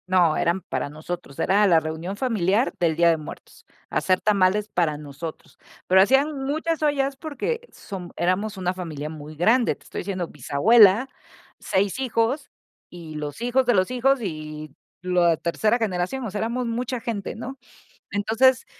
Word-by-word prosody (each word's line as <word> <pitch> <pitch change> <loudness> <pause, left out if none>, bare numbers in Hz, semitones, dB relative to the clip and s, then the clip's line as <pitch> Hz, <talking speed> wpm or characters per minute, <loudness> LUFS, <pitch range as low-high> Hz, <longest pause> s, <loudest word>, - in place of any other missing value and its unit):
No, 180 -4 +3
eran 170 +3 +1
para 130 -2 -3
nosotros, 155 -1 -7
era 205 +2 +3
la 170 -3 +5
reunión 160 +5 -5
familiar 225 -1 +1
del 165 -2 +2
Día 170 +1 +4
de 165 - +3
Muertos, 155 - -11 0.2
hacer 185 -1 +1
tamales 205 0 +2
para 165 -7 0
nosotros. 150 +2 -9 0.3
Pero 190 +1 +6
hacían 270 +6 +2
muchas 315 +3 -1
ollas 280 -2 +1
porque 410 - -3
som 185 -3 -8
éramos 195 +4 0
una 180 -1 -1
familia 155 -5 -6
muy 155 0 -9
grande, 230 +10 +3
te - - -24
estoy - - -7
diciendo: 185 -2 -3
"Bisabuela, 200 - +4 0.5
6 195 +5 0
hijos 260 +2 0 0.4
y 165 -3 -10
los 150 +6 -5
hijos 250 +2 +2
de 245 -2 +3
los 185 +5 +2
hijos 260 +1 +2
y 155 -5 -6 0.3
lo 180 -1 +1
a 170 -1 +4
tercera 210 +8 +1
generación. 220 +3 -2
O 215 - -4
sea, 205 - -3
éramos 235 +3 -1
mucha 245 +2 -2
gente, 225 -4 -4
¿no?, 265 +4 -7 0.5
entonces, 235 +6 +3
195 Hz, 165 wpm, -24 LUFS, 170-245 Hz, 0.5 s, Pero